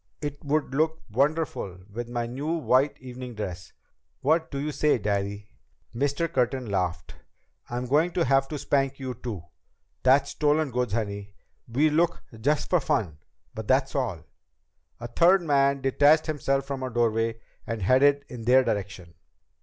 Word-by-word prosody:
It 145 -1 -5
would 145 -1 0
look 160 +3 +1
wonderful 140 - 0 0.2
with 120 +1 -5
my 120 -1 -2
new 140 +7 -3
white 145 -3 +2
evening 125 -1 -8
dress! 90 -4 -6 0.5
What 160 +4 +2
do 140 - -5
you 150 +2 -2
say, 150 -1 +2
Daddy?" 100 -1 -2 0.4
Mr. 145 +6 0
Curtin 130 -2 0
laughed. 90 -5 -2 0.6
"Am 120 +1 -3
I - - -5
going 155 +7 +3
to 175 - +1
have 135 +1 +3
to 150 - -5
spank 135 -1 0
you 130 -1 -4
too? 115 -7 -6 0.6
That's 135 +2 +4
stolen 150 -1 +1
goods, 125 -3 -1
honey. 100 -3 -3 0.3
We 145 +7 +2
look 170 +2 +1 0.2
just 145 +6 +1
for 180 - +5
fun. 110 - -1 0.3
But 110 -1 -7
that's 135 +1 +2
all." 115 - -2 0.8
A 120 - -7
third 175 +9 +4
man 140 -3 +2
detached 145 +4 +4
himself 135 -3 -1
from 135 -1 -4
a 130 - -3
doorway 115 -1 0 0.3
and 115 -3 -3
headed 140 +6 +4
in 115 -2 -8
their 130 +2 +6
direction. 95 -6 -4
130 Hz, 160 wpm, -26 LUFS, 115-145 Hz, 0.8 s, their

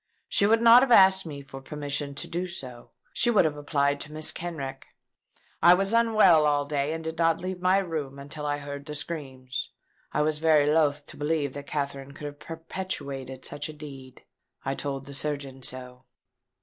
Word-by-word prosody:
She 200 - +3
would 225 +2 +3
not 235 +1 +9
have 265 -2 +1
asked 190 -4 +7
me 140 -2 -7
for 135 0 -10
permission 145 0 -4
to - - -2
do 180 +2 -3
so. 130 -9 -8 0.2
She 240 - +2
would 215 -7 +4
have 155 -2 0
applied 145 -1 0
to 145 - -6
Mrs. 155 0 -2
Kenrick. 145 -6 -6 0.7
I 175 +1 +8
was 195 +3 0
unwell 215 -9 +5
all 145 -1 +2
day, 145 0 -1
and 160 0 -5
did 160 +1 -5
not 165 -1 +3
leave 185 0 -5
my 185 +1 +4
room 155 -8 -3
until 145 +2 -7
I 145 0 -1
heard 140 0 -7
the 150 - -5
screams. 135 -5 -5 0.4
I 150 - +1
was 155 0 0
very 155 -2 +4
loath 150 -2 +2
to - - -11
believe 145 -2 -1
that 140 0 -8
Katherine 140 -1 -4
could 150 - -9
have 145 0 -7
perpetrated 140 -6 -6
such 145 +1 -4
a - - -7
deed. 135 -4 -11 0.4
I 135 - 0
told 135 -1 -4
the 140 - -9
surgeon 140 -2 -3
so." 125 0 -7
150 Hz, 190 wpm, -27 LUFS, 140-165 Hz, 0.7 s, not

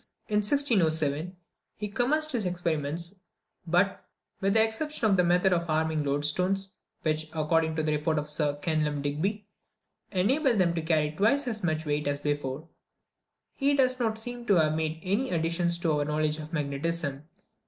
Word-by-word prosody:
In 210 - +1
1607, 180 - +1 0.4
he 210 - -3
commenced 275 +9 +1
his 240 -5 -1
experiments; 170 0 -2 0.5
but, 180 +4 +1 0.4
with 195 +2 +1
the 220 - +7
exception 230 +4 -2
of 190 - +3
a - - +5
method 180 +2 +3
of 170 -1 -1
arming 155 -1 +1
loadstones, 180 +8 0 0.3
which, 155 0 -1
according 160 0 +1
to 160 - 0
the 155 - 0
report 150 +1 0
of 150 0 -2
Sir 150 -1 0
Kenelm 150 -3 0
Digby, 190 +9 -2 0.7
enabled 235 - +2
them 175 -3 +3
to 165 - -2
carry 155 -2 +1
twice 230 - +2
as 215 -4 -3
much 160 -2 -1
weight 150 0 -1
as 145 0 -1
before, 145 0 -3 0.9
he 280 +1 +2
does 255 -2 +2
not 220 -2 0
seem 240 +1 -6
to 200 - +5
have 155 -3 +3
made 160 0 -2
any 205 +8 0
additions 170 +1 +1
to 170 -2 0
our - - +1
knowledge 150 +1 0
of 155 0 -8
magnetism. 150 -1 -2
170 Hz, 165 wpm, -28 LUFS, 155-205 Hz, 0.9 s, the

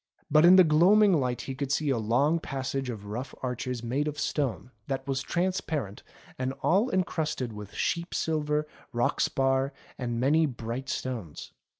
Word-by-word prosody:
But 155 +2 +6
in 180 +2 +9
the 185 - +9
gloaming 185 +6 +5
light 125 -6 0
he 135 - -5
could 135 0 -4
see 145 0 +1
a 125 - +1
long 135 +9 +2
passage 135 -3 -3
of 105 -4 -6
rough 120 +6 -5
arches 125 -1 -3
made 135 +6 -1
of 150 -1 -3 0.2
rock 135 -6 0 0.3
that 135 0 -3
was 135 -1 -1
trans 185 +5 0
parent 125 -11 -4 0.4
and 130 +1 -1
all 205 +8 +3
encrusted 160 -9 -1
with 105 -1 -9
sheep 170 +1 -1
silver, 150 -1 0 0.3
rock 120 0 0
spar, 135 +1 +1 0.3
and 120 -2 -2
many 155 +5 +3
bright 120 0 -5
stones. 115 -12 -5
135 Hz, 170 wpm, -28 LUFS, 125-155 Hz, 0.4 s, in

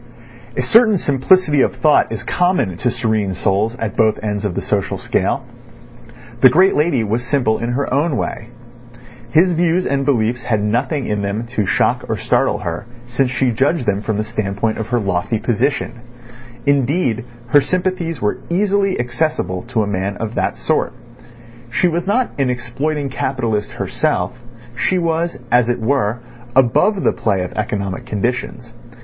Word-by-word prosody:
A 130 - +1
certain 220 - +5
simplicity 150 +1 +3
of - - +1
thought 155 -1 +3
is - - -4
common 175 - +1
to 125 - 0
serene 110 -5 -1
souls 105 +6 0
at 115 -3 -4
both 110 -2 +3
ends 105 -1 -2
of 95 -4 -2
the - - -1
social - - -1
scale. - - -1 1.0
The 130 - +9
great 185 +9 +4
lady 150 -6 +2
was 110 +3 -1
simple 120 -3 +1
in 120 +1 -2
her 140 0 -1
own 145 0 +1
way. 110 - -4 0.8
His 175 +6 +4
views 175 +2 +1
and 140 0 0
beliefs 120 -3 +1
had 110 -3 0
nothing 125 +6 0
in 105 -1 -1
them 100 +3 -2
to 105 -5 +1
shock - - +1
or - - 0
startle - - +1
her, 85 +5 -5 0.2
since 125 +2 0
she 125 0 +1
judged 135 +5 +1
them 100 -2 0
from 110 -1 -2
the 105 - 0
standpoint 110 0 -2
of 110 - -3
her 120 0 +1
lofty 100 +2 -1
position. 120 +2 -1 0.6
Indeed, 140 -3 +1 0.3
her 145 +3 +6
sympathies 180 -1 -1
were 105 - -1
easily 195 +1 +1
accessible 120 - -1
to 115 -3 0
a - - -3
man 100 0 -2
of 110 0 -4
that - - -1
sort. - - 0 0.8
She 130 +9 +2
was 175 +1 -1
not 245 +5 +1
an 135 -2 +2
exploiting 140 +4 -2
capitalist 120 -6 -2
herself; 125 - -1 0.4
she 185 - +1
was, 170 0 0
as 120 -1 +4
it 120 - 0
were, 120 -1 0 0.3
above 135 - +3
the - - +3
play 100 -4 0
of 90 - -6
economic 105 +1 -3
conditions. 120 +1 -3
125 Hz, 165 wpm, -18 LUFS, 110-150 Hz, 1.0 s, The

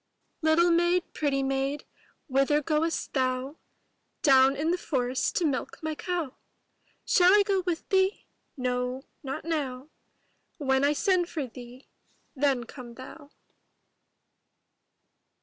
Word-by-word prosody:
ITTLE 330 +2 +4
maid, 345 +1 +3
pretty 275 -2 0
maid, 270 +2 -1 0.4
whither 275 +2 +2
goest 310 +2 -1
thou? 260 +2 -1 0.7
Down 270 -2 +6
in 310 +4 0
the 360 - +1
forest 255 -5 -1
to 345 - +1
milk 280 -4 -2
my 315 0 -2
cow. 335 -4 -4 0.7
Shall 360 -1 +5
I 415 - +6
go 395 -1 +1
with 335 -2 -2
thee? 385 +1 +2 0.3
No, 250 0 -2 0.2
not 270 +1 -5
now; 285 -4 -3 0.7
When 265 -2 +1
I 285 +1 +4
send 360 +1 +1
for 300 -5 -3
thee, 250 +1 -12 0.5
then 270 -3 +1
come 240 0 -11
thou. 285 +3 -11
285 Hz, 120 wpm, -28 LUFS, 260-330 Hz, 0.7 s, Down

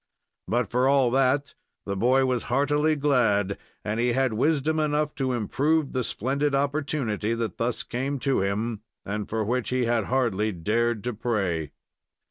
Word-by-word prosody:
But, 120 +2 0
for 125 +2 +2
all 135 -3 +4
that, 135 +2 +2 0.3
the 100 - -2
boy 130 +6 +3
was 125 -2 0
heartily 145 +4 +2
glad, 115 -9 +2 0.3
and 110 +1 -1
he 120 0 +2
had 130 -2 +1
wisdom 155 +5 +1
enough 150 0 0
to 130 -1 +1
improve 140 +6 0
the 130 -1 0
splendid 140 +6 -1
opportunity 135 -6 -1
that 115 -5 -4
thus 120 +1 -1
came 135 +4 -3
to 135 -6 +1
him, 105 +3 -2 0.2
and 105 +1 -4
for 110 -1 -1
which 125 +2 -1
he 125 -1 +1
had 115 -3 +1
hardly 110 -5 0
dared 110 +5 0
to 125 +1 -2
pray. 100 - -2
125 Hz, 160 wpm, -26 LUFS, 110-140 Hz, 0.3 s, all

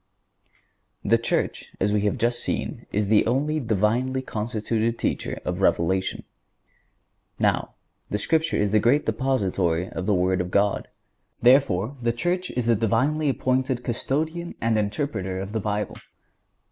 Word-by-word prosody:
The 115 - +4
Church, 115 - -1
as 105 +2 +1
we 105 - +2
have 105 - +1
just 120 +1 +1
seen, - - -3
is 105 0 0
the 105 0 +5
only 145 +6 +1
Divinely 120 +3 0
constituted 115 0 -2
teacher - - -2
of - - -2
Revelation. 95 +3 +1 1.1
Now, - - 0 0.3
the 105 - 0
Scripture 160 +9 +1
is 105 -1 +1
the 110 - +4
great 125 +8 +3
depository 95 -8 0
of 95 - -4
the 105 - +3
Word 90 +1 +2
of 90 - -4
God. 100 +2 +1 0.5
Therefore, 125 -2 +3
the 115 0 +2
Church 175 +8 -1
is 125 -2 -2
the 115 0 +4
divinely 140 +8 +1
appointed 130 -1 0
Custodian 155 +8 -2
and 115 0 +1
Interpreter 100 -4 -2
of 95 +1 -5
the 110 - -1
Bible. 105 +1 -2
115 Hz, 145 wpm, -24 LUFS, 100-130 Hz, 1.1 s, the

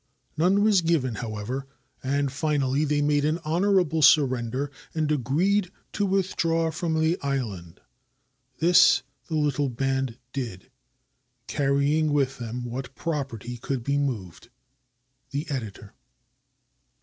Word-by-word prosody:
None 185 +5 +3
was 210 -4 +4
given, 160 -7 +1
however, 120 +4 -4 0.3
and 140 +1 0
finally 145 -1 0
they 145 0 +1
made 145 0 +2
an 155 +2 +1
honorable 175 -1 +2
surrender 130 -1 +3 0.2
and 155 -2 0
agreed 170 - +1 0.2
to 205 -1 0
withdraw 165 -4 +1
from 160 0 -1
the 160 +3 +1
island. 110 -12 -3 0.8
This 165 -7 +5 0.2
the 160 - -3
little 145 -2 +1
band 135 -1 -1 0.2
did, 115 -9 -5 0.7
carrying 145 +3 +1
with 135 -3 +1
them 120 +1 -5
what 125 +2 -6
property 130 -7 -4
could 125 +1 -3
be 140 +3 +1
moved. 115 -8 -4 0.8
The 145 +4 -3
Editor. 105 -6 -5
140 Hz, 115 wpm, -26 LUFS, 125-160 Hz, 0.8 s, This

